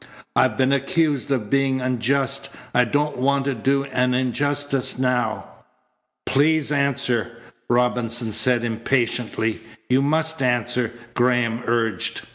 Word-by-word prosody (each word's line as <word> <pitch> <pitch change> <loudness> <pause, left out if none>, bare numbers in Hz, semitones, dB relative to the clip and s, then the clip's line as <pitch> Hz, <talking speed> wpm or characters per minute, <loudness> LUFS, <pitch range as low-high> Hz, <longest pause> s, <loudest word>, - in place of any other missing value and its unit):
I've - - +3
been 130 0 +2
accused 140 +1 0
of 120 -7 -1
being 135 -1 +2
unjust. 135 +2 -1 0.2
I 125 0 +4
don't 145 +4 -1
want 135 +2 +1
to 140 - 0
do 135 +4 +1
an 125 -2 0
injustice 140 +1 0
now." 125 -3 0 0.8
"Please 150 +1 +2
answer," 135 -5 0 0.3
Robinson 120 -1 +1
said 120 +3 +2
impatiently. 115 -1 -1 0.3
"You 130 +1 +4
must 160 +1 0
answer," 120 -1 0 0.2
Graham 120 -2 +1
urged. 115 -2 0
125 Hz, 115 wpm, -22 LUFS, 120-140 Hz, 0.8 s, I